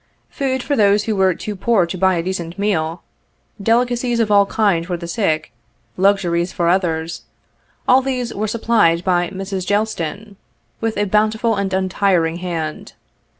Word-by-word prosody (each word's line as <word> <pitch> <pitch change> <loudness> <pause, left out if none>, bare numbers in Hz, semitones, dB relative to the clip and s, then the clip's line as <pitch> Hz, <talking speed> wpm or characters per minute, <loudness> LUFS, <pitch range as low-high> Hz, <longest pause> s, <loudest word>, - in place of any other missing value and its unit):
Food 260 -3 -2
for 285 - 0
those 205 -2 +3
who 220 0 -1
were 190 -2 +3
too 210 - -5
poor 200 -1 +2
to 170 - -5
buy 190 0 +2
a 165 - -1
decent 175 -1 -4
meal, 170 -5 -1 0.6
delicacies 240 +2 +1
of 220 -2 +1
all 200 -1 +5
kinds 195 -7 +1
for 180 -1 -2
the 170 - -7
sick, 160 -5 -1 0.4
luxuries 185 -2 +1
for 175 -3 -1
others 165 -3 -1 0.3
— - - -40
all 260 +1 +6
these 255 -3 -3
were 215 +2 -2
supplied 215 -6 +2
by 175 -2 +1
Mrs. 195 -1 -4
Gelston, 205 -1 -2 0.4
with 225 -2 -2
a 205 - +1
bountiful 215 +3 +1
and 200 -1 -2
untiring 185 -3 +1
hand. 165 -4 -5
195 Hz, 160 wpm, -19 LUFS, 175-220 Hz, 0.6 s, all